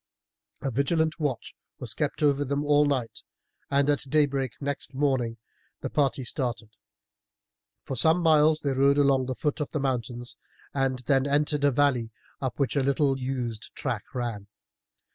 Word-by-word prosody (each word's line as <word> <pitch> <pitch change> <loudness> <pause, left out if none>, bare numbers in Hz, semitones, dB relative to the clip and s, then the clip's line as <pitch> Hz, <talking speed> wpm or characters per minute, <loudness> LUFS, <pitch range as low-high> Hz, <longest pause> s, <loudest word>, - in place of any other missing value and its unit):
A 135 - -1
vigilant 160 +6 0
watch 140 -7 -2 0.2
was 120 -2 -5
kept 150 +2 -2
over 145 -1 +3
them 140 +1 -2
all 145 0 +4
night, 130 -5 -2 0.5
and 140 0 +2
at 145 -2 0
daybreak 140 -4 +1
next 140 -1 -4
morning 130 -5 0 0.4
the - - -4
party 135 -3 +1
started. 120 -3 -1 1.1
For 135 - -4
some 160 +7 +5
miles 155 -1 +4
they 140 - 0
rode 140 +2 +3
along 140 -2 +4
at 130 - -4
the 130 - -3
foot 150 +3 -2
of 150 - -2
the 155 - -2
mountains, 120 -2 -3 0.4
and 135 -1 0
then 135 0 +2
entered 145 +1 +1
a 145 - +5
valley 125 -4 +1 0.3
up 130 -2 -3
which 140 -2 0
a 140 - +3
little 135 0 +1
used 125 -4 -4
track 120 -6 -3
ran. 115 -5 -3
140 Hz, 160 wpm, -27 LUFS, 125-145 Hz, 1.1 s, some